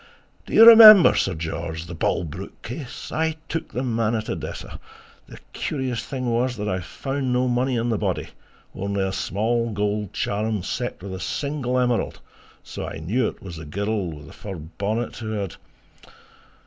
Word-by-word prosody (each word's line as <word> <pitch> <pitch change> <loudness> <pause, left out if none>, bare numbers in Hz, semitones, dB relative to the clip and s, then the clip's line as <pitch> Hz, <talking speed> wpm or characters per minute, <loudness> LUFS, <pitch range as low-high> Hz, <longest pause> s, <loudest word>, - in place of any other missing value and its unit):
"... - - -36
do - - -8
you 225 - +10
remember, 220 -4 +11
Sir - - 0
George, 80 0 -4
the 90 - -8
Bolbrook 80 -1 -3
case! 130 +2 -7
I 160 0 0
took 165 - -4
the 125 - -3
man 115 -2 0
at 110 - -3
Odessa...." - - -6 0.2
"... - - -27
the - - -11 0.2
curious 130 -5 -3
thing 130 -2 -5
was 120 +1 0
that 105 0 -3
I 95 -2 -1
found 135 - -3
no 125 +1 +2
money 125 +1 +1
on 115 +1 -1
the 110 - 0
body, 95 -4 -2 0.4
only 100 0 -2
a 95 - -1
small 115 +5 -1
gold 105 -1 -2
charm 105 -1 -2
set 120 -2 -4
with 100 -1 -6
a 95 - -5
single 130 +5 -2
emerald, 125 -2 0 0.4
so - - -6
I - - -6
knew 105 +10 0
it - - -8
was 90 -4 -8
the 80 - -8
girl 100 +4 -2
with 75 -3 -9
the - - -13
fur 100 -2 -7
bonnet 100 +8 -4
who 110 -2 -5
had..." 100 -4 -4
110 Hz, 185 wpm, -23 LUFS, 95-125 Hz, 0.4 s, remember